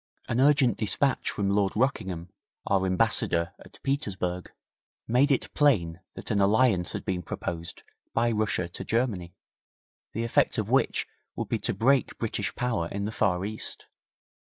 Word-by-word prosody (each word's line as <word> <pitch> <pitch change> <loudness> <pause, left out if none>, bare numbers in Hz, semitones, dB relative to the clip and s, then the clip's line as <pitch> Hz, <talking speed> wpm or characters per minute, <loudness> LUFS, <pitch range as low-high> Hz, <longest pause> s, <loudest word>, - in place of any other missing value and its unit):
An 120 - -1
urgent 135 -6 +4
despatch 130 +5 +2
from 100 -1 -1
Lord 100 -1 +1
Rockingham, 95 -8 -1 0.4
our 95 -1 +1
Ambassador 95 -4 +2
at - - -17
Petersburg, 95 -10 -2 0.6
made 130 +5 +3
it 135 - 0
plain 90 - +2 0.2
that - - -6
an 100 -2 +2
alliance 100 -3 +3
had - - -5
been 90 -2 -1
proposed 85 0 -5 0.3
by 120 +1 +1
Russia 105 -5 0
to 85 - -7
Germany, 100 -7 -1 0.8
the 115 - -2
effect 115 - +2
of - - -2
which - - +2 0.3
would - - -4
be - - 0
to - - -1
break 130 +6 +2
British 105 -3 -2
power 115 -9 -1
in 100 +3 -4
the 105 - -3
Far 95 -4 0
East. 110 +1 -3
105 Hz, 150 wpm, -27 LUFS, 90-120 Hz, 0.8 s, urgent